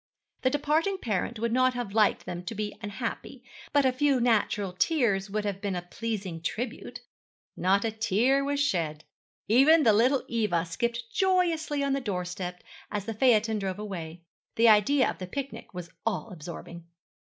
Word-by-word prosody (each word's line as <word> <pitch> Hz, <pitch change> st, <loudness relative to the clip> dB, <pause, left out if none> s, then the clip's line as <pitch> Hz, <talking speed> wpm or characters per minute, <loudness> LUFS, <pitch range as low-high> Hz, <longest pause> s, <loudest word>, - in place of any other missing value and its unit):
The 255 Hz, -, +3 dB
departing 305 Hz, +7 st, +1 dB
parent 230 Hz, -, -2 dB
would 230 Hz, +1 st, -1 dB
not 255 Hz, +1 st, +3 dB
have 240 Hz, -5 st, -4 dB
liked 215 Hz, -1 st, +3 dB
them 175 Hz, 0 st, -5 dB
to 225 Hz, -, -5 dB
be 210 Hz, 0 st, -3 dB
unhappy, 230 Hz, +4 st, -5 dB, 0.3 s
but 285 Hz, -2 st, +3 dB
a 260 Hz, -, +4 dB
few 270 Hz, +1 st, +2 dB
natural 210 Hz, -5 st, +1 dB
tears 205 Hz, -, +1 dB
would 210 Hz, +1 st, -2 dB
have 200 Hz, -1 st, -3 dB
been 200 Hz, -2 st, -2 dB
a 175 Hz, -, -3 dB
pleasing 190 Hz, -3 st, -4 dB
tribute. 235 Hz, +8 st, -4 dB, 0.5 s
Not 195 Hz, +4 st, +2 dB
a 225 Hz, -, 0 dB
tear 225 Hz, +5 st, +2 dB
was 285 Hz, 0 st, -1 dB
shed. 165 Hz, -, 0 dB, 0.4 s
Even 290 Hz, +8 st, +6 dB
the 220 Hz, -, +5 dB
little 250 Hz, +6 st, +3 dB
Eva 210 Hz, -8 st, 0 dB
skipped 235 Hz, +7 st, -3 dB
joyously 335 Hz, -6 st, +1 dB
on 275 Hz, -1 st, +1 dB
the 275 Hz, -, -1 dB
doorstep 180 Hz, -4 st, -4 dB, 0.3 s
as 205 Hz, -2 st, -3 dB
the 225 Hz, -, -3 dB
phaeton 220 Hz, -2 st, +3 dB
drove 190 Hz, -1 st, -3 dB
away. 175 Hz, -5 st, -7 dB, 0.3 s
The 230 Hz, 0 st, +5 dB
idea 220 Hz, +6 st, +5 dB
of -, -, -4 dB
the 185 Hz, -, -5 dB
picnic 275 Hz, +8 st, -6 dB
was 175 Hz, -2 st, -8 dB
all 225 Hz, 0 st, -2 dB
absorbing. 170 Hz, 0 st, -9 dB
220 Hz, 170 wpm, -28 LUFS, 190-260 Hz, 0.5 s, Even